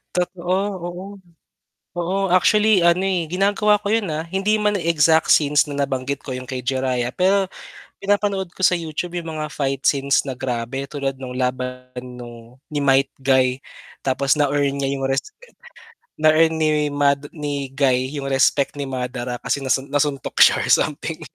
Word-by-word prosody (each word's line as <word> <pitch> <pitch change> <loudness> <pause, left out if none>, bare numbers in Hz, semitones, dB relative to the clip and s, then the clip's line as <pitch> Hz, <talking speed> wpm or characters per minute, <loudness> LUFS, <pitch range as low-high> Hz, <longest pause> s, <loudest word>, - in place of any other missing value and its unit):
Totoo, 180 0 -1 0.3
oo. 175 +2 -7 0.9
Oo, 185 +2 -1
actually 210 +2 +4
ano, 175 +2 +3
eh, 180 -4 -1
ginagawa 205 +3 +2
ko 205 +1 -3
yun, 220 -5 +1
ah. 155 +1 -3
Hindi 195 +5 0
man 210 -2 0
exact 160 -1 +3
scenes 150 0 +4
na 140 - -5
nabanggit 135 0 -4
ko 130 - -5
yung 130 0 -6
kay 130 -2 -5
Jiraiya, 130 -1 -1
pero 195 +2 +2 0.5
pinapanood 200 -2 -1
ko - - -11
sa 180 -1 +4
YouTube 170 +2 -5
yung 165 -2 -5
mga 155 0 -4
fight 135 -2 -2
scenes 140 -1 +2
na 130 -3 -6
grabe, 130 +1 -3
tulad 135 -2 -4
nung 130 -1 -7
laban 125 0 -3
nung 125 0 -10
ni 150 - -4
Might 135 0 +3
Guy 130 -1 +2 0.5
tapos 135 +2 +1
na-earn 140 -1 +1
niya 140 0 -1
yung 135 -1 -3
respect 430 - -5 0.6
na 155 0 +4
earn 160 0 +3
ni 150 -1 +1
Mad 145 0 +1
ni 145 -3 -4
Guy 130 -1 +1
yung 140 - -4
respect 135 +1 +2
ni 140 -1 -5
Madara 125 -1 -4
kasi 140 - -2
nasun 135 0 0
nasuntok 145 -1 -1
siya - - +7
or - - -4
something. - - 0
145 Hz, 165 wpm, -21 LUFS, 130-175 Hz, 0.9 s, siya